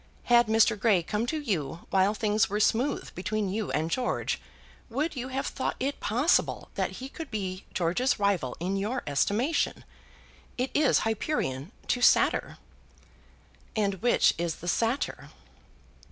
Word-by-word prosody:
Had 240 Hz, -1 st, +5 dB
Mr. 220 Hz, 0 st, +4 dB
Grey 200 Hz, -5 st, +3 dB
come 210 Hz, +6 st, -2 dB
to 310 Hz, +4 st, -1 dB
you 170 Hz, -, -3 dB
while 195 Hz, +2 st, +3 dB
things 215 Hz, -1 st, +1 dB
were 205 Hz, +1 st, -1 dB
smooth 250 Hz, +6 st, +1 dB
between 205 Hz, +2 st, -2 dB
you 210 Hz, +1 st, -2 dB
and 160 Hz, +2 st, -1 dB
George, 250 Hz, +4 st, -1 dB, 0.5 s
would 295 Hz, +7 st, -1 dB
you 255 Hz, 0 st, -4 dB
have 265 Hz, +1 st, -3 dB
thought -, -, -2 dB
it 275 Hz, +2 st, -2 dB
possible 250 Hz, +10 st, +1 dB
that -, -, -2 dB
he 260 Hz, -, -7 dB
could 315 Hz, +2 st, -8 dB
be 190 Hz, -3 st, -4 dB
George's 185 Hz, +10 st, +1 dB
rival 195 Hz, -11 st, 0 dB
in 185 Hz, +3 st, -1 dB
your 220 Hz, +6 st, -2 dB
estimation? 210 Hz, -, 0 dB, 0.7 s
It 255 Hz, +1 st, -1 dB
is 295 Hz, -6 st, +3 dB
Hyperion 210 Hz, -, -2 dB, 0.2 s
to 245 Hz, -, +1 dB
Satyr." -, -, +3 dB, 1.2 s
"And 200 Hz, -4 st, 0 dB
which 240 Hz, -, +4 dB
is 170 Hz, -2 st, -1 dB
the 175 Hz, -, -10 dB
Satyr?" 230 Hz, +8 st, -1 dB
215 Hz, 145 wpm, -28 LUFS, 190-250 Hz, 1.2 s, Had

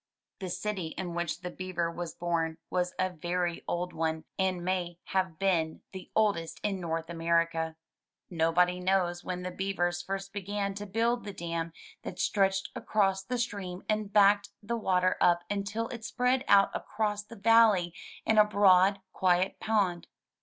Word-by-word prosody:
The 190 Hz, -2 st, -4 dB
city 185 Hz, -2 st, -3 dB
in 180 Hz, -2 st, -4 dB
which 175 Hz, 0 st, -2 dB
the 180 Hz, -1 st, -5 dB
Beaver 175 Hz, -2 st, -2 dB
was 170 Hz, -1 st, -6 dB
born 165 Hz, -2 st, -1 dB
was 180 Hz, 0 st, 0 dB
a 185 Hz, 0 st, 0 dB
very 175 Hz, +1 st, -2 dB
old 180 Hz, +1 st, -2 dB
one, 160 Hz, 0 st, -1 dB, 0.2 s
and 185 Hz, -2 st, 0 dB
may 180 Hz, -2 st, -1 dB
have 185 Hz, -4 st, 0 dB
been 165 Hz, -4 st, 0 dB
the 190 Hz, -1 st, -9 dB
oldest 200 Hz, -7 st, +1 dB
in 200 Hz, -2 st, -1 dB
North 165 Hz, -1 st, -2 dB
America. 165 Hz, -1 st, 0 dB, 0.5 s
Nobody 175 Hz, +2 st, +2 dB
knows 180 Hz, -1 st, +1 dB
when 180 Hz, 0 st, -4 dB
the 180 Hz, -, -4 dB
beavers 175 Hz, -2 st, -1 dB
first 195 Hz, +2 st, -5 dB
began 200 Hz, 0 st, -2 dB
to 205 Hz, +1 st, -6 dB
build 230 Hz, +4 st, +1 dB
the 205 Hz, -, -6 dB
dam 170 Hz, -2 st, -3 dB, 0.3 s
that 180 Hz, -, -7 dB
stretched 195 Hz, 0 st, +1 dB
across 195 Hz, -2 st, +1 dB
the 250 Hz, +6 st, -3 dB
stream 200 Hz, -6 st, -4 dB
and 215 Hz, -2 st, -1 dB
backed 205 Hz, 0 st, +5 dB
the 235 Hz, +3 st, -2 dB
water 185 Hz, -4 st, +1 dB
up 175 Hz, 0 st, +4 dB
until 205 Hz, +3 st, -2 dB
it 235 Hz, -3 st, -7 dB
spread 250 Hz, +3 st, +1 dB
out 200 Hz, -1 st, +6 dB
across 210 Hz, -1 st, -2 dB
the 225 Hz, +3 st, -12 dB
valley 210 Hz, -5 st, +5 dB, 0.3 s
in 220 Hz, -1 st, +4 dB
a -, -, +10 dB
broad, 195 Hz, -2 st, +4 dB
quiet 185 Hz, +1 st, +2 dB
pond. 195 Hz, -6 st, 0 dB
185 Hz, 160 wpm, -30 LUFS, 175-205 Hz, 0.5 s, a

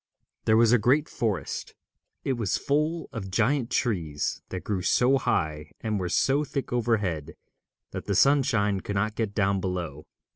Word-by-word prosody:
There 110 Hz, -, +4 dB
was 115 Hz, -1 st, +5 dB
a 125 Hz, -, +5 dB
great 145 Hz, +8 st, +3 dB
forest. 105 Hz, -6 st, -3 dB, 0.5 s
It 135 Hz, -, 0 dB
was 115 Hz, -6 st, 0 dB
full 155 Hz, +4 st, 0 dB
of 95 Hz, -5 st, -5 dB
giant 120 Hz, +5 st, +1 dB
trees 80 Hz, -, -1 dB
that 95 Hz, -, -5 dB
grew 100 Hz, -3 st, -2 dB
so 125 Hz, +9 st, +3 dB
high 80 Hz, -, -1 dB
and 110 Hz, -2 st, -2 dB
were 90 Hz, -1 st, -2 dB
so 140 Hz, +9 st, +2 dB
thick 140 Hz, -3 st, -4 dB
overhead 105 Hz, -10 st, 0 dB, 0.6 s
that -, -, -6 dB
the -, -, -1 dB
sunshine 125 Hz, -8 st, +3 dB
could 100 Hz, +2 st, -5 dB
not 105 Hz, +2 st, 0 dB
get 110 Hz, -3 st, -3 dB
down 100 Hz, -1 st, +2 dB
below. 85 Hz, -6 st, -4 dB
110 Hz, 160 wpm, -27 LUFS, 95-125 Hz, 0.6 s, was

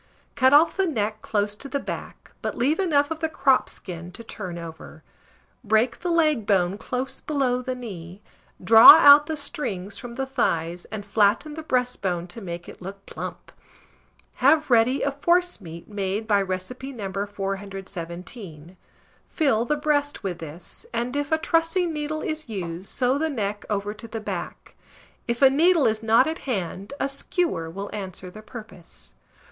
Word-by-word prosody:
Cut 260 Hz, -2 st, +4 dB
off 300 Hz, +4 st, +6 dB
the 385 Hz, -1 st, +2 dB
neck 215 Hz, -7 st, -2 dB
close 205 Hz, -1 st, -1 dB
to 275 Hz, +7 st, -9 dB
the 280 Hz, -, -1 dB
back, -, -, -7 dB
but -, -, -3 dB
leave 285 Hz, +8 st, +1 dB
enough 295 Hz, -5 st, +2 dB
of 320 Hz, -, -3 dB
the 320 Hz, 0 st, -1 dB
crop 270 Hz, -4 st, +2 dB
skin 175 Hz, -1 st, -7 dB
to 230 Hz, -, -9 dB
turn 185 Hz, -6 st, -6 dB
over; 160 Hz, -1 st, -10 dB, 0.6 s
break 220 Hz, +2 st, +2 dB
the 355 Hz, -, -3 dB
leg 305 Hz, -10 st, +2 dB
bone 190 Hz, -1 st, +2 dB
close 260 Hz, +3 st, -4 dB
below 265 Hz, -4 st, 0 dB
the 255 Hz, 0 st, -3 dB
knee, 190 Hz, -7 st, -8 dB, 0.4 s
draw 225 Hz, 0 st, +11 dB
out 290 Hz, -1 st, +8 dB
the 315 Hz, -, -3 dB
strings 205 Hz, -9 st, -5 dB
from 240 Hz, -1 st, -8 dB
the 270 Hz, +1 st, -2 dB
thighs, 175 Hz, -10 st, -1 dB
and 210 Hz, -1 st, -7 dB
flatten 210 Hz, +8 st, +2 dB
the 320 Hz, -, -6 dB
breastbone 250 Hz, -, -1 dB
to 200 Hz, +6 st, -9 dB
make 175 Hz, -2 st, -6 dB
it -, -, -12 dB
look 195 Hz, +2 st, -9 dB
plump. -, -, -8 dB, 0.9 s
Have 310 Hz, -3 st, +3 dB
ready 240 Hz, +3 st, +4 dB
a 280 Hz, -, +1 dB
forcemeat 285 Hz, -, -1 dB
made 205 Hz, +1 st, -3 dB
by 205 Hz, -2 st, +3 dB
recipe 195 Hz, +8 st, -5 dB
No. 200 Hz, -7 st, -6 dB
417; 190 Hz, -3 st, -7 dB, 0.5 s
fill 255 Hz, -8 st, +1 dB
the 300 Hz, -, +1 dB
breast 290 Hz, -2 st, 0 dB
with 180 Hz, -3 st, -3 dB
this, 165 Hz, +2 st, -9 dB
and, 240 Hz, +3 st, -2 dB
if 290 Hz, 0 st, -2 dB
a 315 Hz, -, +4 dB
trussing 330 Hz, +2 st, +1 dB
needle 305 Hz, +1 st, -3 dB
is 310 Hz, -4 st, -4 dB
used, 180 Hz, -3 st, -5 dB
sew 260 Hz, +1 st, +1 dB
the 320 Hz, +1 st, 0 dB
neck 210 Hz, -6 st, -3 dB
over 205 Hz, 0 st, -2 dB
to 230 Hz, +2 st, -11 dB
the 225 Hz, 0 st, -5 dB
back; 215 Hz, -, -6 dB, 0.5 s
if 235 Hz, +3 st, 0 dB
a 270 Hz, -, +9 dB
needle 330 Hz, +2 st, +4 dB
is 220 Hz, 0 st, +1 dB
not 225 Hz, +3 st, +4 dB
at 320 Hz, +2 st, -3 dB
hand, 195 Hz, -2 st, -3 dB
a 270 Hz, -, +1 dB
skewer 275 Hz, -, -2 dB
will 195 Hz, +4 st, -6 dB
answer 185 Hz, -3 st, -7 dB
the 215 Hz, -, -11 dB
purpose. 215 Hz, -, -11 dB
225 Hz, 170 wpm, -24 LUFS, 195-285 Hz, 0.9 s, draw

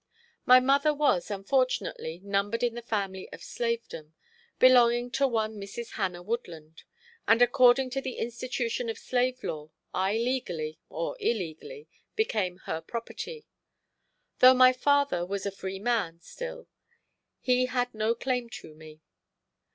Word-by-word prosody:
My 255 Hz, 0 st, +9 dB
mother 280 Hz, +4 st, +3 dB
was, 285 Hz, -12 st, +1 dB
unfortunately, 200 Hz, -5 st, -1 dB
numbered 200 Hz, +3 st, -1 dB
in 240 Hz, -1 st, +1 dB
the 240 Hz, -, -6 dB
family 200 Hz, -5 st, -3 dB
of -, -, -10 dB
slavedom, 230 Hz, -10 st, -4 dB, 0.4 s
belonging 245 Hz, -1 st, +5 dB
to 275 Hz, +2 st, +2 dB
one 220 Hz, -3 st, -1 dB
Mrs. 225 Hz, +4 st, -7 dB
Hannah 180 Hz, -4 st, -3 dB
Woodland, 170 Hz, -8 st, -6 dB, 0.4 s
and 225 Hz, +1 st, +5 dB
according 250 Hz, +1 st, +5 dB
to 270 Hz, +1 st, -2 dB
the 260 Hz, -2 st, -5 dB
institution 240 Hz, 0 st, -3 dB
of 225 Hz, -, -4 dB
slave 255 Hz, 0 st, -1 dB
law, 150 Hz, -1 st, -5 dB, 0.2 s
I 190 Hz, +2 st, +1 dB
legally, 180 Hz, -11 st, -2 dB
or -, -, -4 dB
illegally, 235 Hz, -, -3 dB, 0.3 s
became 205 Hz, -, 0 dB
her 160 Hz, -, -3 dB
property. 235 Hz, -, -7 dB, 0.9 s
Though 255 Hz, +1 st, +8 dB
my 255 Hz, 0 st, +7 dB
father 285 Hz, -8 st, +2 dB
was 195 Hz, +2 st, -4 dB
a 200 Hz, -, -1 dB
free 190 Hz, 0 st, -6 dB
man 200 Hz, -6 st, -1 dB
still -, -, -8 dB, 0.7 s
he 255 Hz, -1 st, +2 dB
had 245 Hz, -1 st, -1 dB
no 220 Hz, +1 st, 0 dB
claim 250 Hz, -1 st, -2 dB
to 155 Hz, -, -12 dB
me. 155 Hz, 0 st, -14 dB
235 Hz, 135 wpm, -28 LUFS, 195-255 Hz, 0.9 s, My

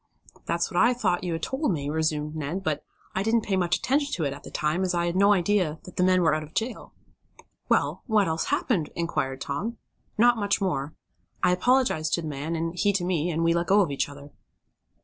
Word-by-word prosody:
"That's 170 Hz, 0 st, 0 dB
what 175 Hz, -, +2 dB
I 245 Hz, +2 st, +4 dB
thought 190 Hz, -7 st, 0 dB
you 175 Hz, -2 st, -2 dB
had 165 Hz, -, -4 dB
told 265 Hz, -2 st, 0 dB
me," 145 Hz, -5 st, -2 dB
resumed 155 Hz, 0 st, -1 dB
Ned, 155 Hz, +5 st, -3 dB
"but 155 Hz, -5 st, -1 dB, 0.3 s
I 190 Hz, -, 0 dB
didn't 225 Hz, +3 st, +2 dB
pay 200 Hz, -, -2 dB
any 185 Hz, -1 st, +2 dB
attention 280 Hz, -, +1 dB
to 170 Hz, -, -1 dB
it 140 Hz, -2 st, -1 dB
at 140 Hz, -, -10 dB
the -, -, -10 dB
time, 155 Hz, +4 st, -1 dB
as 185 Hz, -1 st, 0 dB
I 170 Hz, 0 st, +1 dB
had 175 Hz, 0 st, -1 dB
no 200 Hz, +2 st, +5 dB
idea 185 Hz, -4 st, +2 dB
that 180 Hz, -, -12 dB
the 180 Hz, -, +3 dB
men 185 Hz, -1 st, +4 dB
were 165 Hz, -, +4 dB
out 155 Hz, -, 0 dB
of 155 Hz, +1 st, -11 dB
jail." 230 Hz, +2 st, -3 dB, 0.8 s
"Well, -, -, +1 dB
what 215 Hz, -4 st, +3 dB
else 160 Hz, 0 st, -1 dB
happened?" 235 Hz, -, 0 dB
inquired 135 Hz, -6 st, -2 dB
Tom 210 Hz, +12 st, -3 dB, 0.4 s
"Not 240 Hz, +2 st, +5 dB
much 200 Hz, -2 st, +1 dB
more. 155 Hz, -7 st, -2 dB, 0.5 s
I -, -, +5 dB
apologized 185 Hz, -5 st, +2 dB
to 170 Hz, -, -4 dB
the -, -, -4 dB
man, 150 Hz, +3 st, -3 dB
and 165 Hz, +1 st, -2 dB
he 205 Hz, +3 st, +2 dB
to 185 Hz, -3 st, 0 dB
me, 175 Hz, -2 st, 0 dB
and 165 Hz, 0 st, -1 dB
we 165 Hz, 0 st, +3 dB
let 170 Hz, 0 st, 0 dB
go 200 Hz, +1 st, +5 dB
of 175 Hz, -7 st, 0 dB
each 140 Hz, 0 st, -1 dB
other." 145 Hz, 0 st, -12 dB
175 Hz, 230 wpm, -26 LUFS, 155-205 Hz, 0.8 s, no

